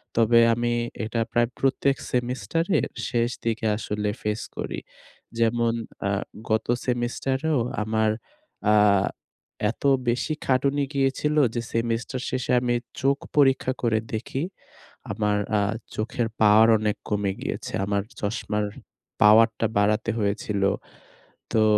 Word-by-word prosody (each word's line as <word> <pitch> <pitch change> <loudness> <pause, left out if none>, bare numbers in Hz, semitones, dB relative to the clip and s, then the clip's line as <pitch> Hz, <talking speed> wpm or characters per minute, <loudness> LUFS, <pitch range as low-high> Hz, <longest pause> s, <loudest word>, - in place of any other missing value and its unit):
তবে 115 +1 +5
আমি 120 0 0 0.3
এটা 115 +1 -1
প্রায় 120 0 +2
প্রত্যেক 135 0 +2 0.2
সেমিস্টারের 130 +8 0 0.2
শেষ 120 -1 +1 0.2
দিকে 115 0 -1
আসলে 105 -1 -2
ফেস 105 +1 -2 0.2
করি। - - -3 0.6
যেমন, 115 0 +2 0.3
আ - - +1 0.4
গত 110 0 +1 0.2
সেমিস্টারেও 130 +4 0 0.2
আমার 110 0 +1 0.6
আ - - +6 1.0
এত - - -16 0.3
বেশি 125 +6 0
খাটুনি 140 +2 +2
গিয়েছিল 140 +2 +1 0.2
যে, 120 - 0
সেমিস্টার 115 +2 -1
শেষে 130 -1 -2
আমি 120 -1 0 0.3
চোখ 140 +1 +3 0.2
পরীক্ষা 135 -2 +4
করে 115 -2 +2
দেখি। 130 +6 -3 0.7
আমার 105 0 0 0.2
আ - - +2 0.4
চোখের 115 +2 -1
পাওয়ার 110 +1 +7
অনেক 105 -1 0
কমে 100 -2 0
গিয়েছে। - - -4
আমার 100 0 0 0.2
চশমার 105 0 -1 0.6
পাওয়ারটা 115 +2 +6
বাড়াতে 105 +2 +2
হয়েছিল। 100 -1 -1 0.9
তো, 110 - +4
115 Hz, 115 wpm, -25 LUFS, 110-130 Hz, 1.0 s, পাওয়ার